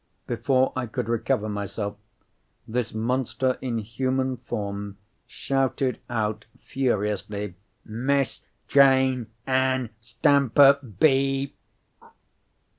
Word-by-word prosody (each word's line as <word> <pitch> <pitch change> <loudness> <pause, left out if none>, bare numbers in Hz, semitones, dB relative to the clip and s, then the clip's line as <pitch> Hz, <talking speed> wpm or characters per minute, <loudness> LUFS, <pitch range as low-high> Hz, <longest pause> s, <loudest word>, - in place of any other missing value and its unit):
Before 130 +3 +1
I 130 -1 -2
could 120 0 -4
recover 110 -2 0
myself, 100 0 -4 0.7
this 120 0 -2
monster 125 +3 -1
in 125 -3 -2
human 130 +4 -1
form 100 -4 -5 0.3
shouted 135 -1 -1
out 110 -2 -2
furiously, 105 -5 -2 0.3
"Miss 130 +4 -1 0.3
Jane 130 -3 +4 0.2
Ann 130 -2 +1
Stamper 140 +3 +4 0.2
be 135 -1 +2
——!" - - -45
125 Hz, 90 wpm, -25 LUFS, 110-135 Hz, 0.7 s, Jane